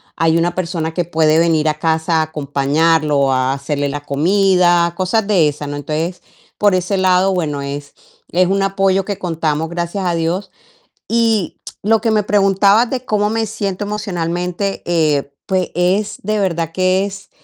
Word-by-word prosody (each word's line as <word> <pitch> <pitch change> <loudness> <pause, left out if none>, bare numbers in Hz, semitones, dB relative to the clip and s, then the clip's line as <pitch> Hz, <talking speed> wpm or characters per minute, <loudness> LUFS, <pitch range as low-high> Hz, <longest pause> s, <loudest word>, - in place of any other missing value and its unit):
hay 165 0 +2
una 175 +1 0
persona 165 -3 -2
que 175 -1 -1
puede 160 -1 +2
venir 160 -2 +2
a 150 - -1
casa 160 +1 0
a - - +2
acompañarlo, 150 +1 +1
o 135 -1 +2
a 130 +1 +1
hacerle 140 +1 -2
la 145 +1 -4
comida, 175 +2 +2
cosas 200 +3 0
de 175 -8 +3
esas, 145 0 -6
¿no? 145 - -4
Entonces, 155 +5 -4 0.3
por 205 -2 +3
ese 185 +2 0
lado, 185 +1 +3
bueno, 150 -5 -2
es 140 +1 -6 0.4
es 180 +1 +3
un 195 +1 +1
apoyo 195 -1 +1
que 205 -2 -4
contamos, 160 -3 -2
gracias 175 +3 -3
a 175 -1 0
Dios. 175 +4 -2 0.6
Y 225 -5 +1 0.2
lo 220 +1 +3
que 225 0 0
me 210 -2 +2
preguntabas 200 +3 +3
de 255 -1 -3
cómo 210 -2 0
me 225 0 -1
siento 205 -2 -3
emocionalmente, 180 -2 -3
eh, 150 -5 +1
pues, 185 -2 0
es 195 +3 0
de 215 +2 -1
verdad 170 -4 -1
que 185 +1 +1
es 195 0 -9
175 Hz, 170 wpm, -17 LUFS, 160-195 Hz, 0.6 s, de